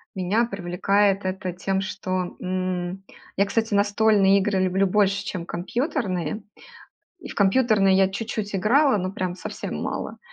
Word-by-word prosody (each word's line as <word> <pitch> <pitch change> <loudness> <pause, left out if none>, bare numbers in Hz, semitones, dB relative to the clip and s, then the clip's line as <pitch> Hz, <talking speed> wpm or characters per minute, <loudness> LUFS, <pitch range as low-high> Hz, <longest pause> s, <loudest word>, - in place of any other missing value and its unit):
меня 195 +5 +1
привлекает 195 0 +1
это 185 -1 -3
тем, 190 +2 -1
что, 185 -2 -3
м, 185 0 -3 0.3
я, 200 - +4
кстати, 220 +2 -1
настольные 205 -1 +4
игры 195 0 0
люблю 190 +1 +2
больше, 200 0 +2
чем 185 -4 -5
компьютерные, 200 - -2 0.8
и 315 - -9
в - - -8
компьютерные 200 -2 +3
я 190 0 +4
чуть-чуть 210 +1 -4
играла, 255 +8 +3
ну, 185 0 -3
прям 185 -4 -3
совсем 180 - -6
мало. - - -4
195 Hz, 140 wpm, -24 LUFS, 185-210 Hz, 0.8 s, я